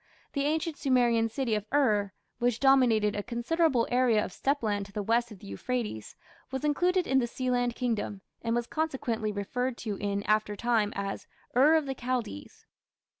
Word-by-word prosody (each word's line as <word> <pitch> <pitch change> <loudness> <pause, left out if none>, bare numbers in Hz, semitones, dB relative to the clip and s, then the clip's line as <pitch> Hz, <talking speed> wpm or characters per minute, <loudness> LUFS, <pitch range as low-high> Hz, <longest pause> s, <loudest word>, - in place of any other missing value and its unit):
The 280 -1 0
ancient 315 +1 -1
Sumerian 240 -5 +2
city 245 -1 -1
of 210 0 -1
Ur, 215 -9 +2 0.3
which 240 -2 +1
dominated 240 -6 +4
a 205 - -1
considerable 245 +3 +1
area 245 -4 +3
of - - -8
steppe 280 -1 0
land 205 -2 -1
to - - -16
the 205 +1 -3
west 235 +3 +1
of 210 - -9
the - - -14
Euphrates, 160 - -4 0.3
was 265 0 -4
included 355 +5 +2
in 265 0 +3
the 240 - 0
Sealand 245 -1 -1
kingdom, 220 -5 -2 0.2
and 230 0 0
was 240 0 0
consequently 250 -8 -2
referred 240 +5 -2
to 205 -3 -2
in 200 -1 -2
after 215 0 +1
time 225 -2 +1
as 195 0 -4 0.3
"Ur 290 +6 +6
of 315 -2 +2
the 270 - -2
Chaldees". 245 - -4
240 Hz, 175 wpm, -29 LUFS, 210-265 Hz, 0.3 s, Ur